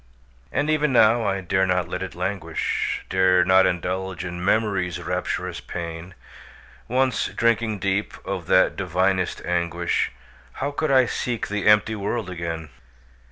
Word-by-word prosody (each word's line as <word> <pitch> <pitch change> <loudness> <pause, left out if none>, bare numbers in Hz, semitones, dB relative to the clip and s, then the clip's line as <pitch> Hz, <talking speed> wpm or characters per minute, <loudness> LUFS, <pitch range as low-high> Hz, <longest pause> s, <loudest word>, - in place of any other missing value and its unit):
And 145 +2 0
even 150 -1 +2
now, 115 -1 +5
I 95 -1 -1
dare 95 +1 +1
not 90 -1 +1
let 90 - -4
it 95 - -5
languish, 90 -2 -2
Dare 95 -1 +3
not 95 0 +5
indulge 90 0 -3
in 90 0 -5
Memory's 95 -4 +1
rapturous 90 +1 -3
pain; 85 +1 -7 0.7
Once 130 0 +1
drinking 115 -2 +1
deep 100 +2 -1
of - - -4
that - - +4
divinest 95 -1 0
anguish, 85 0 0 0.4
How 140 +2 -3
could 155 +2 -1
I 130 -2 +5
seek 120 -1 -3
the 105 0 -1
empty 105 +1 +5
world 105 -1 -3
again? 85 -3 -5
95 Hz, 140 wpm, -23 LUFS, 90-110 Hz, 0.7 s, now